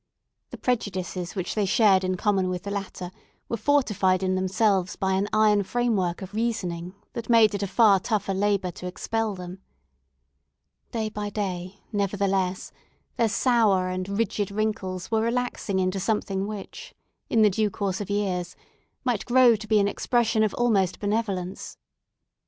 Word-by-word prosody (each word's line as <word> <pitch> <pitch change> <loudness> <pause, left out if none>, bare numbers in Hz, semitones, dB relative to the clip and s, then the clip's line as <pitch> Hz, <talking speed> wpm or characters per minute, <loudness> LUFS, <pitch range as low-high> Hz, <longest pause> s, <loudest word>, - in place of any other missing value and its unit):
The - - -8
prejudices 185 -6 -2
which 185 -3 -3
they 210 -2 0
shared 195 -2 +4
in 185 0 -1
common 195 -2 +1
with 180 -1 -3
the 200 - -5
latter 195 -3 -5 0.4
were - - -2
fortified 210 -7 +2
in 185 0 +1
themselves 190 0 +1
by 190 0 0
an 195 +2 +1
iron 215 -1 +4
frame 240 +3 0
work 180 -1 -1
of 190 - -9
reasoning, 185 -6 -2 0.2
that 235 0 -6
made 225 -3 +6
it 200 - -2
a 200 - -1
far 205 0 +5
tougher 205 -1 -1
labour 195 -2 0
to 180 - -8
expel 220 +3 -2
them. 180 +1 -8 1.3
Day 220 -2 -2
by 210 -1 -4
day, 190 -2 -4
nevertheless, 195 -2 -1 0.5
their 230 -2 +3
sour 215 -6 +2
and 185 +1 -3
rigid 205 -1 -1
wrinkles 200 -3 -3
were 220 -1 +2
relaxing 235 -4 -1
into 185 +1 0
something 195 -1 -1
which, 215 - -8 0.3
in 225 -2 +4
the 210 - +5
due 215 +2 +1
course 195 0 -2
of 205 - -6
years, 185 -3 -1 0.5
might 245 -5 0
grow 245 -1 +6
to 215 +1 -8
be 215 -1 +4
an 200 - +3
expression 230 +1 +1
of 215 -2 +1
almost 200 -7 +1
benevolence. 200 -3 -3
200 Hz, 160 wpm, -25 LUFS, 185-220 Hz, 1.3 s, made